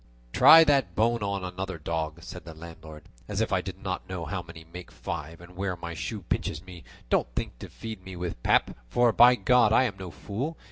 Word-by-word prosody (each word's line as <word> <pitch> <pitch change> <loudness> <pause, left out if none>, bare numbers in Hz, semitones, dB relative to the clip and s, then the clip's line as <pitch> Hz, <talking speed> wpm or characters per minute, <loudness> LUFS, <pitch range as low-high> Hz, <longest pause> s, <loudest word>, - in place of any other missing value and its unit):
"Try 165 0 +9
that 135 - +2
bone 115 +1 +2
on 100 -2 -2
another 90 0 -5
dog," 80 +1 -4
said 90 - -9
the 80 -2 -10
landlord; 80 -2 -11 0.2
"as - - -3
if - - 0
I - - +2
did - - -7
not - - -5
know 90 -3 -4
how 90 +3 -3
many 85 -1 -12
make 90 -1 -9
five, 80 +1 -6
and 90 +1 -14
where 95 0 -2
my 85 -1 -7
shoe 105 +6 -5
pinches 80 -1 -3
me; 90 -2 -11 0.3
don't - - +3
think - - -4
to - - -9
feed 110 -4 -8
me 95 0 -9
with 85 -8 -5
pap, - - +2
for 120 - +3
by 125 +2 +7
God 125 -3 +4
I 125 - +5
am 105 -7 -2
no 95 -1 -6
fool. 105 - -5
90 Hz, 220 wpm, -27 LUFS, 85-110 Hz, 0.3 s, Try